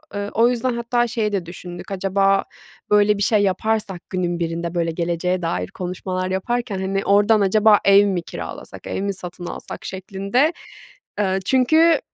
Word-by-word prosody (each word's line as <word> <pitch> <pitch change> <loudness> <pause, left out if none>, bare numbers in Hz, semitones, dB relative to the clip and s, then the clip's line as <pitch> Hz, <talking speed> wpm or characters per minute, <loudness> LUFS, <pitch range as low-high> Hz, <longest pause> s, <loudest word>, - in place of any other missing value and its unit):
Eee, 205 0 -3
o 230 +2 +4
yüzden 250 +1 -1
hatta 240 +1 0
şeyi 220 -2 -1
de 190 -4 -2
düşündük, 175 +2 -9
acaba 195 +1 +2 0.5
böyle 210 0 +4
bir 200 - 0
şey 210 0 +3
yaparsak 200 -1 -1
günün 175 -2 -2
birinde, 170 +1 -3
böyle, 170 -1 0
geleceğe 175 +2 -1
dair 90 - -2
konuşmalar 185 - -4
yaparken, 235 +1 -2
hani, 195 +1 -2
oradan 205 +2 +4
acaba 210 +2 +5
ev 200 +1 +6
mi 185 -3 0
kiralasak, - - -8
ev - - -3
mi 200 0 -1
satın 180 -1 -8
alsak - - -7
şeklinde. 200 - 0 0.7
Iıı, 190 -2 +1
çünkü 315 - +4
195 Hz, 160 wpm, -21 LUFS, 180-215 Hz, 0.7 s, ev